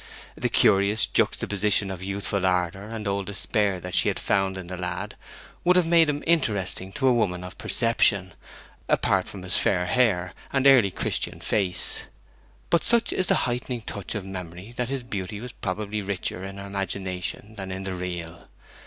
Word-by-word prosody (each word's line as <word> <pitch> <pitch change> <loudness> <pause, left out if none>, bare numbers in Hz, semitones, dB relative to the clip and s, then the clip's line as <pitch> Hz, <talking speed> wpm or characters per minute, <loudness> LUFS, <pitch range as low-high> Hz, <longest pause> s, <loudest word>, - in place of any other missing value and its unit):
The - - -1
curious 100 +2 +4
juxtaposition 105 0 +1
of 90 -2 -6
youthful 100 0 -2
ardour 90 +1 +1
and 110 -1 -5
old 100 -1 -1
despair 100 -1 0
that 90 +1 -7
she - - +4
had - - +1
found 95 -1 +1
in 95 - -6
the 90 +1 -6
lad 90 0 -4 0.5
would 180 +1 +5
have 180 -2 +4
made 165 -1 +5
him 145 0 -2
interesting 100 - 0
to 135 - +1
a 130 - +6
woman 90 -6 0
of 90 0 -9
perception, 100 -6 +2 0.6
apart - - +2
from 95 -2 -8
his 90 - +1
fair 90 -2 +2
hair 95 -7 +2 0.2
and 135 0 +1
early 130 -7 +7
Christian - - -2
face. 95 -3 0 0.7
But 170 - +4
such 235 -1 +3
is 185 - 0
the - - +3
heightening 125 0 -2
touch 100 -1 -4
of 105 -3 -3
memory 90 +2 -7
that 125 -1 -2
his 135 -2 -2
beauty 100 -4 -4
was 125 +2 -7
probably 105 0 -3
richer 95 -2 -3
in 95 0 -7
her 100 - -7
imagination 95 +1 -3
than 95 -3 -6
in 95 +1 -4
the 95 -1 -3
real. 85 -2 -5
100 Hz, 180 wpm, -26 LUFS, 95-115 Hz, 0.7 s, early